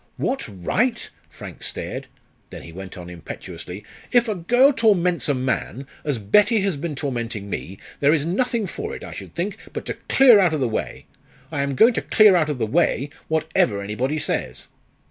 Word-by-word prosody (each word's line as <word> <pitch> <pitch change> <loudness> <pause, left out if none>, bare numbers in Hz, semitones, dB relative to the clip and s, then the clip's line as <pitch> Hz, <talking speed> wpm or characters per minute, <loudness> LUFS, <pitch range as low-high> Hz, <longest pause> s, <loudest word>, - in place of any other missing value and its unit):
"What 270 - -2
right?" 215 - -1 0.2
Frank - - -11
stared, - - -4 0.4
then - - -9
he 85 - -10
went 95 +2 -9
on 90 -1 -8
impetuously. 90 +2 -8 0.3
"If 240 -1 +4
a 215 - 0
girl 245 +10 +4
torments 180 - +2
a 145 - +2
man, 130 +1 -2 0.2
as 145 -4 0
Betty 205 - +3
has 195 -4 0
been 150 +1 -4
tormenting 120 -7 -4
me, 95 +2 -5 0.2
there 145 +1 +4
is 155 -2 +2
nothing 225 +5 0
for 435 - -5
it, - - -9
I - - -8
should - - -9
think, - - -2 0.2
but - - -5
to - - -2 0.2
clear 250 -6 +7
out 175 -5 +3
of - - -2
the 130 - +1
way. 110 - -4 0.5
I 145 -3 -1
am 140 -1 -1
going 230 - +6
to - - -1
clear 215 -3 +5
out 155 -3 +2
of 145 - -2
the 115 - 0
way, 145 +1 +1 0.2
whatever 160 -10 +1
anybody 115 +9 -2
says." 65 - -2
150 Hz, 190 wpm, -22 LUFS, -, 0.5 s, clear